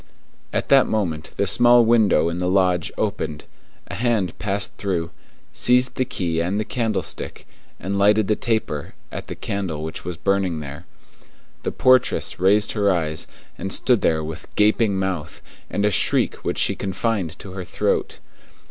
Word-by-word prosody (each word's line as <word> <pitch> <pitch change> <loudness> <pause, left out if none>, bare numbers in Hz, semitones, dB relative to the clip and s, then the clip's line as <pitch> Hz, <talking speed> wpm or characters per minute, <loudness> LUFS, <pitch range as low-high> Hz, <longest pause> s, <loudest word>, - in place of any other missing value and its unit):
At - - -2
that 135 -1 +6
moment 85 -8 -2
the 100 - +2
small 120 +3 +5
window 110 -8 +4
in 85 +1 -2
the 90 0 0
lodge 90 -3 +2
opened, 75 -1 -2 0.4
a - - -8
hand 110 -7 0
passed 100 0 -2
through, 85 -5 -2 0.4
seized 125 +1 +3
the 130 - 0
key 85 -9 -1
and 95 +5 -1
the 110 - -2
candlestick, 115 -5 -3 0.3
and 100 +2 -2
lighted 105 +1 +4
the 105 - +2
taper 110 - -2 0.2
at - - -6
the - - -6
candle 90 -7 -4
which 80 - -6
was 90 -1 -5
burning 95 -3 0
there. 75 +3 -8 0.7
The - - -2
portress 130 -1 +2
raised 100 +3 +3
her 100 -2 +2
eyes, 80 -3 -1 0.3
and 95 - -3
stood 120 0 +3
there 80 -2 +1
with 80 +2 -7
gaping 105 -1 +3
mouth, 90 -4 -3 0.3
and 105 - 0
a 105 - +3
shriek - - +1
which - - -3
she - - +3
confined 95 -3 -2
to 95 - -10
her 95 0 -6
throat. - - -1
95 Hz, 165 wpm, -22 LUFS, 85-110 Hz, 0.7 s, that